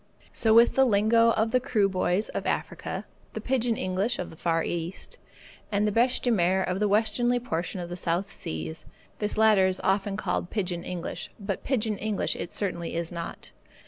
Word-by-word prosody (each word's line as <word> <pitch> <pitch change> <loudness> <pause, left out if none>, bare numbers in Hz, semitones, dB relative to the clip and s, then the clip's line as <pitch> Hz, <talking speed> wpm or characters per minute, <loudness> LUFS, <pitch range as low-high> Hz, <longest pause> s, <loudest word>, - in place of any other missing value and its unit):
So 220 - +2
with 230 +2 +6
the 265 - +5
lingo 230 0 +4
of 225 0 +1
the 255 - +4
Kroo 225 -6 +2
boys 185 +1 0
of - - -4
Africa, - - -3 0.3
the - - -4
pigeon 245 -3 0
English 190 +6 -1
of - - -5
the - - -12
Far 165 0 0
East, 170 +1 -4 0.5
and 205 +1 +2
the - - +1
bêche 245 +4 +2
de 245 - +2
mer 190 -2 +2
of 185 +1 -2
the 210 - +2
westerly 240 +4 +2
portion 180 -5 -3
of 175 - -5
the 175 - -4
South 180 +2 -1
Seas. 80 0 -6 0.4
This 210 0 0
latter 215 -3 +5
is 185 0 0
often 195 +1 +1
called 180 -3 -2
pigeon 180 -5 -2
English, 175 -2 -5
but 200 -2 -4
pigeon 220 -6 -1
English 215 -1 -1
it 170 - -5
certainly 170 -5 -3
is 170 0 -2
not. 170 -1 -7
200 Hz, 190 wpm, -27 LUFS, 180-225 Hz, 0.5 s, with